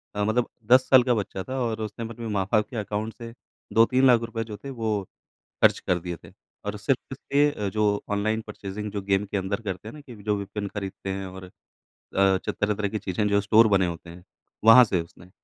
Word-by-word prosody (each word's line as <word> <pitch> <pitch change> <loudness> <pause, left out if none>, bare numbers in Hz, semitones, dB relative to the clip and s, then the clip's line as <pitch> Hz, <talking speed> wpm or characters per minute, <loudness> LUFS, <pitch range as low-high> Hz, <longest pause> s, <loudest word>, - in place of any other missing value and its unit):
अ, 105 - 0
मतलब 120 +3 +1 0.2
10 130 0 +6
साल 130 -2 +7
का 125 -1 +2
बच्चा 95 -2 -3
था 130 +5 -4
और 115 -3 -2
उसने 110 +2 -5
अपने 115 0 -7
माँ-बाप 105 +1 +1
के 120 - -6
अकाउंट 105 +2 -3
से 115 -1 -9 0.4
₹2-3 115 -1 +3
जो 105 -2 -8
थे, 140 - -9
वो 110 -5 -2 0.6
खर्च - - +5
कर 90 -1 0
दिए 85 0 -5
थे - - -13 0.3
और - - -3
सिर्फ़ - - -2
इसलिए 140 -8 0
जो 105 0 +1
ऑनलाइन 110 +2 0
परचेज़िंग 105 0 -6
जो 100 - -3
गेम 100 +1 +1
के 100 - -3
अंदर 100 +3 -2
करते 95 0 -5
हैं - - -8
ना 150 - -11
कि 125 -5 -12
जो 105 -1 +1
वेपन 100 +1 -5
खरीदते 95 -1 -6
हैं 95 0 -3
और 95 0 -10
अ, - - -13 0.7
जो 95 -1 +2
तरह-तरह 105 0 -1
की 110 - -3
चीज़ें 105 +3 -1
जो 100 0 +2
स्टोर 110 +2 +5
बने 95 -1 +3
होते 85 0 -7
हैं। 90 +1 -12 0.4
वहाँ 125 +3 +10
से 95 -6 0
उसने 90 +2 -14
105 Hz, 210 wpm, -25 LUFS, 95-115 Hz, 0.7 s, वहाँ